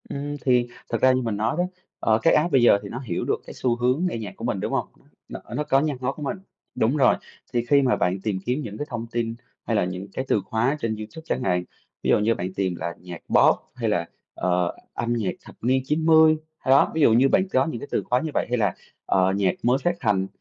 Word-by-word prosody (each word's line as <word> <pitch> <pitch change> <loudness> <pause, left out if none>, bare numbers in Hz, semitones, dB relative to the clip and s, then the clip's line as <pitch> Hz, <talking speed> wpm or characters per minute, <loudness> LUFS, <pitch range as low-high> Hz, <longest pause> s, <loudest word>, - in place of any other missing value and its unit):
Ừm, 145 +1 -4
thì 125 -2 +3 0.2
thật 115 -2 -2
ra 130 - +6
như 130 0 +1
mình 115 -4 -2
nói 110 +5 0
đó, 175 - +2 0.4
ờ, 110 0 +2
cái - - +4
app 165 +3 +2
bây 135 - +4
giờ 120 - +6
thì 100 - -7
nó 120 - -5
hiểu 115 -10 -3
được - - -1
cái - - -8
xu 125 -2 0
hướng 125 +8 +1
nghe 115 - -4
nhạc 105 -4 -6
của - - -11
mình, - - -1
đúng - - -3
không? - - 0 0.4
Nó - - -7 0.2
nó 150 - 0
nó 135 - +6
nhạc 145 -3 -2
ngó 130 - 0
của 150 - -8
mình, 200 +7 -2 0.4
đúng 120 +7 +1
rồi, 130 -3 +5 0.4
thì 120 -1 0
khi 140 +3 +4
mà 130 -2 +2
bạn 90 +2 0
tìm 105 -4 -1
kiếm 125 +5 0
những 105 -6 -7
cái 145 - -3
thông 115 -2 -5
tin 115 -1 -2 0.3
hay 115 - 0
là 105 - +2
những 90 +2 -5
cái 130 - -3
từ 105 - +2
khóa 120 +6 0
trên 115 -4 -1
YouTube 110 +10 -8
chẳng 130 - -2
hạn, 90 -3 +1 0.4
ví - - 0
dụ - - +5
như 110 +2 +2
bạn 95 +1 -4
tìm 95 -2 -1
là 85 0 -4
"nhạc 90 -1 -9
pop" - - +6 0.2
hay 115 -3 -1
là, 85 -5 0 0.3
ờ, 90 -1 0 0.2
"âm 120 0 -1
nhạc 110 -6 -1
thập - - -14
niên 130 +3 +2
90", 160 +1 +5 0.2
ơ, - - -6
đó, 135 - +5
ví 160 - +1
dụ 115 - +6
như 130 +4 +5
bạn 190 - +3
có 130 -6 +2
những 155 -8 -4
cái 140 - -8
từ - - 0
khóa 125 - +1
như 160 - -3
vậy - - +1
hay 125 - +1
là, 105 -5 +1 0.3
ờ, 95 0 +2
"nhạc 95 -2 +2
mới 125 +2 +3
phát 175 0 +1
hành", 100 -5 +1
120 Hz, 270 wpm, -24 LUFS, 105-135 Hz, 0.4 s, ra